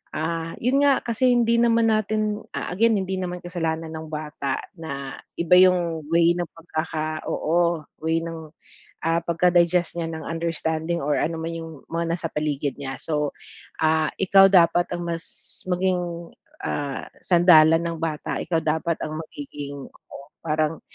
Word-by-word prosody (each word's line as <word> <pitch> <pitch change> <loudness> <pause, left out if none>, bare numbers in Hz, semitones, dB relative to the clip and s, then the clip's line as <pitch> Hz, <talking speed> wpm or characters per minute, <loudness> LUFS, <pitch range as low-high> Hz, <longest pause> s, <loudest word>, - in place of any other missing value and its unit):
Ah, 165 +1 -2
yun 255 +4 +2
nga, 280 -2 +5
kasi 240 +2 +1
hindi 235 -1 +3
naman 230 -1 +4
natin, 215 0 0 0.2
ah, - - -3
again 225 +3 +3
hindi 190 0 -2
naman 180 -1 -4
kasalanan 165 -2 -3
ng 160 0 -6
bata 150 -3 -3 0.2
na 140 -4 -5 0.2
iba 170 +1 +4
yung 175 -4 +3
way 170 0 +4
ng 175 -1 -2
pagkaka 155 -1 -4
oo, 170 0 +1 0.2
way 165 +1 0
ng, 165 -2 -7 0.6
ah, 165 +1 +2
pagka-digest 175 0 +2
niya 165 - -2
ng 160 -1 -6
understanding 165 0 -2
or 145 +1 +1
ano 165 +1 -1
man 165 +1 -3
yung 165 -1 -6 0.2
mga 170 0 -1
nasa 170 - -4
paligid 145 -2 -1
niya. 135 -1 -4
So, 150 -2 -1 0.5
ah, 155 -1 +2
ikaw 195 0 +7
dapat 175 -1 +5
ang 175 0 -4
mas 165 -1 -3 0.5
maging, 175 -2 -1 0.3
ah, 140 -2 -3 0.2
sandalan 165 -2 +6
ng 165 -1 -3
bata. 160 -2 -2
Ikaw 165 - 0
dapat 160 +2 0
ang 155 0 -4
magiging 145 -2 -8
oo, 140 - -14 0.2
parang 155 0 0
165 Hz, 150 wpm, -24 LUFS, 155-180 Hz, 0.6 s, ikaw